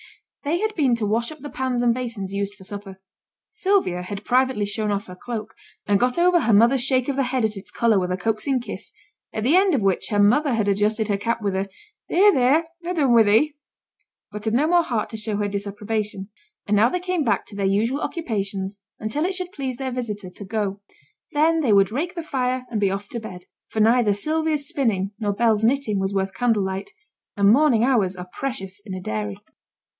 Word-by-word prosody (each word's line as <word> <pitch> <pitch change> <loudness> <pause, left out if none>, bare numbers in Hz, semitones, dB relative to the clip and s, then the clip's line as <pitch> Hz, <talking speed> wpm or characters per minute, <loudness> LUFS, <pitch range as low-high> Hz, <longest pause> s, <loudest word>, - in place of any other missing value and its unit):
They 305 +4 0
had 435 +1 -1
been 275 - +2
to 230 -2 -2
wash 230 +5 0
up 310 - -9
the 290 - -7
pans 255 -2 -1
and 240 -1 +4
basins 230 -6 -4
used 200 0 -2
for 195 - -15
supper; 200 -1 -8 0.5
Sylvia 390 - +1
had 200 +3 -7
privately 255 -4 +2
shown 210 +1 -2
off 205 0 -1
her 180 - -10
cloak, 220 +2 -6 0.3
and 200 -1 +2
got 250 +3 +1
over 350 0 +4
her 230 -8 +2
mother's 235 +5 +5
shake 255 -1 +2
of 280 - -1
the 275 - +1
head 255 -2 0
at 215 -1 -1
its 195 - -9
colour 230 -4 +2
with 180 -1 -2
a 180 - 0
coaxing 225 +7 0
kiss, 240 - -7 0.4
at 215 - -3
the 275 +8 +4
end 380 -3 +4
of 235 - 0
which 195 -2 +1
her 210 - 0
mother 245 +7 +4
had 215 -2 0
adjusted 210 +2 +1
her 205 -2 +1
cap 230 +2 -2
with 200 -2 0
a 195 +1 -2 0.4
'There! 405 +3 +5
there! 265 +6 +4 0.2
ha' 360 +1 -3
done 275 -6 +3
wi' 230 - +7
thee,' 225 +9 +3 0.8
but 210 +1 -7
had 220 +1 +1
no 280 +5 +3
more 350 +1 +5
heart 235 -9 -2
to 220 - -5
show 215 -1 -2
her 205 0 0
disapprobation; 205 0 -3 0.4
and 210 - +1
now 220 +4 +5
they 360 - -1
came 360 -2 -1
back 205 -7 0
to - - -11
their 200 -1 0
usual 225 +9 +1
occupations 200 - -3 0.2
until 220 +8 -2
it 375 +1 -1
should 365 -1 -4
please 265 -7 -4
their 265 +1 -4
visitor 215 -6 -4
to 200 - -9
go; 200 -1 -3 0.5
then 320 +2 +3
they 270 -8 +2
would 195 -1 +4
rake 335 - -2
the 335 - -4
fire 255 -4 -1
and 220 - -1
be 200 - +3
off 195 +1 -4
to 235 - -4
bed; 180 -5 -9 0.2
for 220 - -4
neither 225 -1 +4
Sylvia's 310 +5 0
spinning 205 -9 0
nor 210 -2 0
Bell's 220 0 +2
knitting 230 -4 +2
was 195 +1 -2
worth 195 0 -1
candle 230 -5 +1
light, 190 +1 -4 0.5
and 200 0 +5
morning 265 -4 +4
hours 220 -8 +2
are 180 0 -8
precious 205 -8 -5
in 195 -3 -6
a - - -4
dairy. 105 - -3
225 Hz, 220 wpm, -23 LUFS, 200-270 Hz, 0.8 s, wi